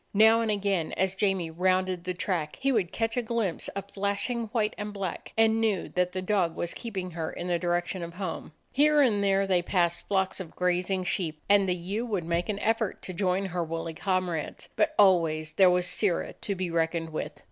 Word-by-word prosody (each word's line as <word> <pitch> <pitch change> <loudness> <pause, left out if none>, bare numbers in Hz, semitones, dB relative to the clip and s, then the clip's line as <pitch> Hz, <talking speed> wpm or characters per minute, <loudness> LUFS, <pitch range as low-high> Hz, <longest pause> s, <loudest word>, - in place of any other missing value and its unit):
Now 220 +2 +6
and 225 - -1
again, 200 -5 0
as 190 0 +1
Jamie 190 -4 0
rounded 185 +1 +1
the 180 0 -2
track, 170 -4 -2
he 275 0 +1
would 205 -8 +1
catch 225 0 -1
a - - +3
glimpse 225 -6 -1
of 200 0 -6
flashing 205 +4 -1
white 215 -1 0
and 210 0 -5
black, 195 -3 -5
and 225 0 +4
knew 215 -5 0
that 180 0 0
the 185 0 -4
dog 185 -4 +1
was 170 - -2
keeping 190 -6 -5
her 160 -1 -4
in 175 - -6
the 175 -1 0
direction 175 +1 -1
of 170 0 -7
home. 185 -4 -5 0.2
Here 295 +1 +4
and 215 -7 +3
there 195 0 +3
they 185 -2 +2
passed 175 -1 0
flocks 190 -1 0
of 180 -4 -8
grazing 180 +1 0
sheep, 175 -4 -1
and 200 -1 +4
the 180 - +2
ewe 190 +6 -3
would 200 -6 -1
make 170 +2 -1
an 205 - -1
effort 225 -2 0
to 185 - -5
join 185 +1 0
her 180 -2 -2
woolly 165 0 -4
comrades; 180 -3 -2
but 310 0 +1
always 165 -5 +4
there 190 +2 +5
was 180 0 +2
Sirrah 180 -1 0
to 200 - -4
be 185 -2 -3
reckoned 165 0 0
with. 155 - -4
185 Hz, 210 wpm, -28 LUFS, 175-205 Hz, 0.2 s, Now